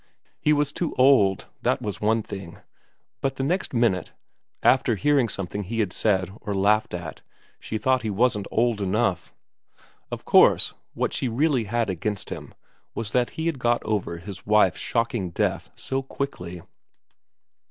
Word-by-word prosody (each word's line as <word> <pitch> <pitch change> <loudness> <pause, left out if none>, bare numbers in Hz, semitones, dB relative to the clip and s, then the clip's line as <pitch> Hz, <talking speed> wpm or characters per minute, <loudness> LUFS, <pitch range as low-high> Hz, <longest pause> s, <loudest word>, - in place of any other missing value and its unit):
He 150 - +2
was 145 -1 +2
too 170 +1 -3
old, 125 -8 +5 0.2
that 130 +2 +1
was 105 -5 -5
one 110 +1 +2
thing; 95 -5 -8 0.6
but 135 -1 -1
the 135 - -3
next 180 +7 0
minute, 115 -8 +1 0.5
after 130 -3 +4
hearing 140 0 +2
something 100 +1 -4
he 110 +4 -4
had 100 -5 0
said 95 -4 +1
or 105 - -3
laughed 105 +1 +2
at, 85 -2 -7 0.4
she 110 - -4
thought 130 +3 +2
he 110 - -3
wasn't 105 -1 +1
old 115 -2 +1
enough. 95 -2 0 0.8
Of - - -6
course - - +5 0.2
what - - -1
she 130 - -1
really 130 0 +1
had 115 +3 0
against 95 +2 -3
him - - -7 0.4
was 110 -2 -3
that 125 -1 +2
he 160 - -2
had 165 -5 -1
got 120 -1 +1
over 100 -6 -2
his 95 +2 -9
wife's 105 -5 +3
shocking 115 -5 -1
death 85 - -1
so 135 0 -3
quickly. 90 -11 -5
110 Hz, 160 wpm, -25 LUFS, 95-130 Hz, 0.8 s, old